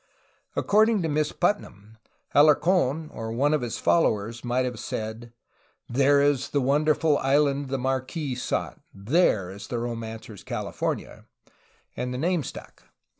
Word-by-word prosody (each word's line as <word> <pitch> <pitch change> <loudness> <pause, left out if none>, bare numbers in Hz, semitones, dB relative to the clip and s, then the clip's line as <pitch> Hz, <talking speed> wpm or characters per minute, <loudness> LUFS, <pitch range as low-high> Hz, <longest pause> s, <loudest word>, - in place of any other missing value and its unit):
According 215 -1 +3
to - - 0
Miss 150 0 0
Putnam, 110 - -2 0.3
Alarc6n 155 0 +3
or 110 0 -5
one 140 +6 +1
of 150 - +1
his 120 -2 -3
followers 115 -7 +1
might 125 +1 0
have 125 -3 -4
said: 110 +2 -5 0.6
"There 140 +3 +3
is 145 -3 +1
the 145 - +1
wonderful 150 +2 +2
island 140 +1 +2
the 135 - -1
Marquis 130 +3 -2
sought 125 - -3
— - - -45 0.2
there 110 - +3
is 100 +1 -9
the 120 - -3
romancer's 115 -3 -6
California" - - -4 0.4
— - - -36
and 125 - -3
the 125 - -3
name 170 +4 +1
stuck. - - -9
135 Hz, 145 wpm, -26 LUFS, 120-150 Hz, 0.6 s, According